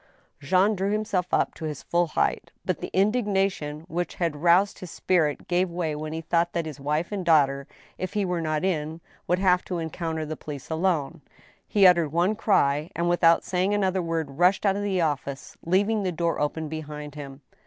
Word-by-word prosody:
Jean 185 +8 +2
drew 195 +1 -1
himself 210 -4 -1
up - - +1
to 160 - -7
his 150 -3 -5
full 175 0 +1
height. - - -1 0.2
But - - -1
the - - -5
indignation 195 -7 0
which 175 +1 -4
had 170 -4 -1
roused 175 +5 +3
his 185 - -8
spirit 160 -4 0
gave 180 +1 +1
way 170 -3 -2
when 155 +1 -5
he 160 +1 -4
thought 170 +1 0
that 170 -1 -1
his 150 -2 -7
wife 150 +6 -1
and 200 -3 -3
daughter, 140 -5 +3 0.3
if 185 0 -4
he 205 -2 0
were 180 -2 -1
not 155 +1 -1
in, 160 -3 -2 0.3
would 180 - +2
have 180 -1 +3
to 180 - -3
encounter 160 -1 -3
the 155 +1 -5
police 145 -1 -8
alone. 165 -2 0 0.5
He 200 -2 +4
uttered 170 -5 +5
one 175 +6 +2
cry, 150 -8 +2
and, 170 +1 0
without 170 -1 +4
saying 185 +3 0
another 190 -2 +1
word, 160 -4 -3
rushed 180 +4 +3
out 195 -1 +3
of 200 - -2
the 195 -3 0
office, 140 -3 -3
leaving 205 +5 +2
the 185 -2 -1
door 170 0 -1
open 155 +2 -2
behind 150 -1 -7
him. 140 -1 -9
170 Hz, 195 wpm, -25 LUFS, 155-185 Hz, 0.5 s, uttered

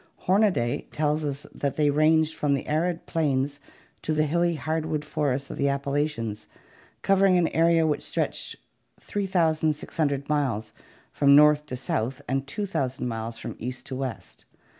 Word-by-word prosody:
Homaday 185 - +2
tells 150 0 0
us 145 -1 -4
that 140 -1 -2
they 150 -1 +3
ranged 155 +2 +3
from 145 -3 +1
the 135 - -4
arid 165 +3 -1
plains 145 -2 0 0.4
to 155 - -1
the 155 - +3
hilly 170 +2 +1
hard 160 +1 -2
wood 150 -1 -2
forests 140 -2 -1
of - - -7
the 140 0 +2
Appalachians, 140 -6 -2 0.6
covering 195 -1 +4
an 170 -2 +2
area 165 0 +3
which 150 -2 0
stretched - - -2 0.4
3600 155 -6 0
miles 130 -8 -1 0.4
from 140 -1 +5
north 150 0 +6
to 130 - -4
south 130 +2 -3
by 135 +1 0
2000 135 -6 -3
miles 115 0 -4
from - - -6
east 125 +2 -6
to 130 - -5
west. 130 -2 -6
150 Hz, 150 wpm, -26 LUFS, 135-160 Hz, 0.6 s, north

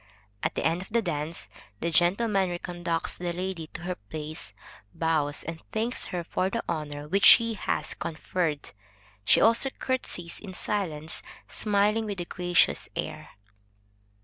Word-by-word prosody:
At - - -1
the - - -1
end 165 +2 +2
of 190 - -9
the 230 +1 +2
dance, 160 -2 -3 0.3
the 170 - 0
gentleman 190 +3 +3
re 175 - -2
conducts 175 -2 -2
the 175 -1 -1
lady 180 -2 -3
to - - -9
her 180 +1 -2
place, 150 - -7 0.4
bows 155 -3 +1
and 165 0 -6
thanks 230 +3 -1
her 175 -1 -3
for 185 +2 0
the 230 +3 -2
honor 150 -2 -3
which 195 +5 +1
she 230 -1 +8
has 210 - -1
conferred. 160 -2 -2 0.5
She - - +6
also 230 +4 +5
curtsies 255 -11 -2
in 190 -3 -8
silence, 160 -8 -2 0.3
smiling 210 +1 +2
with 200 -3 -3
a 175 - -2
gracious 175 0 +2
air. - - -4
175 Hz, 150 wpm, -28 LUFS, 160-200 Hz, 0.5 s, she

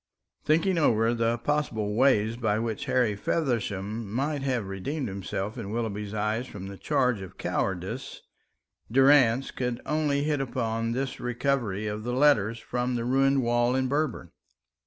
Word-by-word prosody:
Thinking 165 +3 +2
over 115 -5 +3
the 115 0 +1
possible 115 -5 -1
way 115 -2 +3
by 110 -3 0
which 115 -1 -3
Harry 120 -5 +2
Feversham 105 - -2
might 140 +5 -1
have 130 -6 -1
redeemed 125 +9 -3
himself 100 +3 -4
in 100 -4 -5
Willoughby's 105 -2 -3
eyes 110 +4 -1
from 95 -2 -8
the 100 0 -8
charge 125 -8 +1
of 95 - -10
cowardice, 95 +7 -3 0.7
Durrance 135 -1 +5
could 125 -2 -3
only 150 -2 +1
hit 150 -2 0
upon 115 -3 -2
this 135 +2 -3
recovery 120 -4 -1
of 105 0 -3
the 120 +1 -2
letters 125 -5 +3
from 125 +1 -2
the 115 -1 -2
ruined 135 +1 +3
wall 120 +1 +2
in 130 0 +1
Berber. 140 - -2
120 Hz, 150 wpm, -27 LUFS, 105-135 Hz, 0.7 s, Durrance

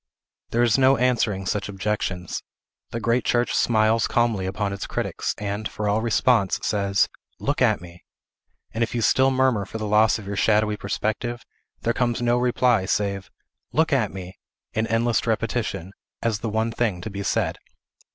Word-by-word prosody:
There 120 +1 +2
is 120 +2 +3
no 135 +1 +5
answering 115 -6 +1
such 105 +1 -2
objections. 95 -3 -3 0.5
The 115 - -4
great 115 +2 +1
church 120 0 +1
smiles 110 -1 +3
calmly 115 -6 +1
upon 100 +1 -2
its 100 - -5
critics, - - -2
and, 105 +1 -3
for 105 - -3
all 105 +2 +2
response, 115 -3 +2
says, 100 -2 +2 0.3
"Look - - -1
at - - +3
me!" 85 0 -13 0.7
and 115 - 0
if 115 - -3
you 115 - 0
still 130 +4 +4
murmur 130 -5 +2
for 100 - -7
the 110 - -4
loss 105 +1 +4
of 105 - -10
your 100 +1 -4
shadowy 105 0 +3
perspective, 110 +4 -3 0.4
there 115 - +1
comes 120 -1 0
no 120 0 +2
reply, 125 -5 +2
save, 100 -1 -1 0.4
"Look 160 -1 +2
at 115 -7 +2
me!" 95 -1 -9 0.3
in 110 +1 0
endless 115 0 +1
repetition, 110 -5 -2 0.3
as 115 -3 0
the 110 - -3
one 110 +2 0
thing 110 -6 -1
to 110 - -6
be 100 0 -5
said. 100 - -1
110 Hz, 170 wpm, -24 LUFS, 100-120 Hz, 0.7 s, no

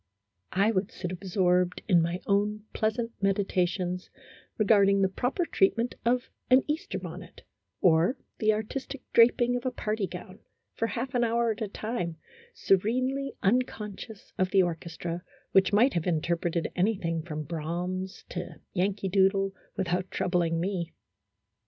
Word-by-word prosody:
I 200 +4 +3
would 200 +1 -1
sit 180 -1 -5
absorbed 180 -1 +1
in 175 -4 +5
my 170 +2 -1
own 205 +1 +1
pleasant 230 +1 0
medita 195 -2 +2
tions 180 0 -4 0.5
regarding 200 -2 +4
the - - +5
proper 250 - -1
treatment 230 -1 +2
of 245 +1 +1 0.2
an 255 +1 +6
Easter 315 +6 -2
bonnet, - - -9 0.4
or 175 +8 +4 0.2
the 215 -1 +4
artistic 255 +6 -4
draping 240 +1 +5
of 245 - -2
a 255 - +1
party 215 -4 -2
gown, 185 +2 -9 0.3
for 225 - -1
half 250 +3 -3
an 245 -1 +2
hour 235 0 +2
at 220 +2 -6
a 215 - 0
time, 200 -5 -4 0.4
serenely 255 +8 +1
unconscious 215 -1 -2
of 185 0 +2
the 190 -1 +5
orchestra, 170 0 -4 0.3
which 195 +2 +4
might 230 +7 +4
have 170 -1 -1
interpreted 170 0 0
anything 180 -4 0
from 155 -2 -5
Brahms 175 +4 -4
to - - -5
" - - -51
Yankee 195 +1 0
Doodle," 195 +1 +3 0.2
without 185 -1 -1
troub 180 - -2
ling 165 -2 +2
me. 175 -2 -2
195 Hz, 145 wpm, -28 LUFS, 180-225 Hz, 0.5 s, an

